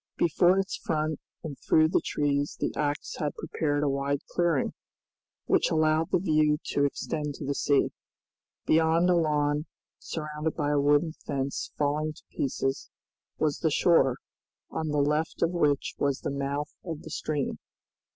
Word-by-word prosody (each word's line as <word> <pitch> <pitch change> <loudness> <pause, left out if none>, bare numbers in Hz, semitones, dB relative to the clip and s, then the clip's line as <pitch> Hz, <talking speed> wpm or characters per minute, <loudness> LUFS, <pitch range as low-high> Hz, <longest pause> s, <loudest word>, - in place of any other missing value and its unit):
Before 175 +3 +4
its 195 0 -1
front 155 -1 -1 0.2
and 155 -4 -5
through 155 0 +4
the - - +2
trees 145 -1 0
the - - -1
axe 145 -1 -2
had 150 -1 -2
prepared 150 -2 -1
a - - +2
wide 140 +1 0
clearing, 170 -6 +1 0.7
which - - +3
allowed 155 0 +2
the - - +3
view 155 -4 +3
to 140 - +2
extend 150 +1 -3
to 145 - -6
the 140 - 0
sea. 140 0 +2 0.7
Beyond 165 +3 +4
a - - +4
lawn, 150 -2 +1 0.3
surrounded 150 0 -4
by 145 -2 0
a 145 - +3
wooden 145 +3 +3
fence 140 -3 -4
falling 150 +1 0
to - - -17
pieces, 135 +1 -2 0.5
was 150 -2 0
the 160 - +2
shore, 140 -5 +4 0.5
on 160 - -2
the 150 -1 -1
left 150 +3 +1
of 170 - +2
which 150 -5 +1
was 140 -1 0
the - - -2
mouth 140 +1 -3
of 165 -4 -6
the 160 - -9
stream. 150 -3 -2
150 Hz, 160 wpm, -28 LUFS, 145-160 Hz, 0.7 s, Before